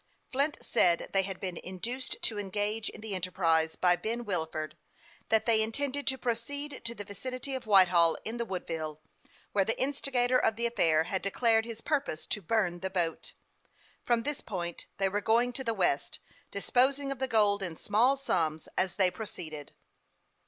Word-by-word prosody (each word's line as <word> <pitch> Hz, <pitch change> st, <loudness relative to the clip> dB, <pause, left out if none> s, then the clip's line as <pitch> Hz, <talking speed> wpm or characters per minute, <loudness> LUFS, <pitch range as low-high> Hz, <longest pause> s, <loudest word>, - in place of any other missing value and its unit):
Flint 280 Hz, +3 st, +1 dB
said 170 Hz, -2 st, +3 dB
they 195 Hz, -, +5 dB
had 190 Hz, -1 st, -5 dB
been 185 Hz, -3 st, -4 dB
induced 235 Hz, +8 st, -4 dB
to 215 Hz, -2 st, 0 dB
engage 205 Hz, +2 st, -1 dB
in -, -, -11 dB
the 220 Hz, -2 st, -5 dB
enterprise 165 Hz, -3 st, +1 dB
by 180 Hz, -1 st, +3 dB
Ben 225 Hz, +7 st, -4 dB
Wilford; 160 Hz, -5 st, -3 dB, 0.5 s
that 220 Hz, -1 st, +3 dB
they 225 Hz, -2 st, +4 dB
intended 280 Hz, +5 st, -1 dB
to 265 Hz, 0 st, +2 dB
proceed 265 Hz, +4 st, -3 dB
to 235 Hz, 0 st, -1 dB
the 205 Hz, -, -5 dB
vicinity 255 Hz, +7 st, -5 dB
of 255 Hz, -3 st, -5 dB
Whitehall 180 Hz, -5 st, +6 dB
in 225 Hz, +2 st, -4 dB
the 235 Hz, -, -2 dB
Woodville, 160 Hz, -6 st, -4 dB, 0.5 s
where 200 Hz, -, +2 dB
the 225 Hz, -, -1 dB
instigator 255 Hz, -2 st, +2 dB
of 220 Hz, -, +1 dB
the 235 Hz, +1 st, 0 dB
affair 165 Hz, -9 st, +3 dB
had 185 Hz, +3 st, -2 dB
declared 225 Hz, +3 st, +3 dB
his 230 Hz, -1 st, -7 dB
purpose 280 Hz, -, -2 dB
to 210 Hz, -, -2 dB
burn 185 Hz, -2 st, 0 dB
the 190 Hz, +1 st, -3 dB
boat. 175 Hz, -4 st, -1 dB, 0.7 s
From 235 Hz, -1 st, +1 dB
this 295 Hz, +1 st, -2 dB
point 175 Hz, -4 st, -5 dB
they 195 Hz, -, +2 dB
were 205 Hz, +2 st, -1 dB
going 235 Hz, +4 st, +2 dB
to 265 Hz, -, -2 dB
the 230 Hz, -3 st, -1 dB
West, 175 Hz, -7 st, 0 dB, 0.3 s
disposing 265 Hz, +7 st, +1 dB
of 270 Hz, -, -4 dB
the 265 Hz, -, 0 dB
gold 210 Hz, -4 st, +3 dB
in 180 Hz, -4 st, -2 dB
small 235 Hz, +10 st, +2 dB
sums 160 Hz, -, -1 dB
as 185 Hz, -1 st, 0 dB
they 185 Hz, -2 st, +3 dB
proceeded. 160 Hz, -9 st, -7 dB
210 Hz, 175 wpm, -30 LUFS, 180-245 Hz, 0.7 s, Whitehall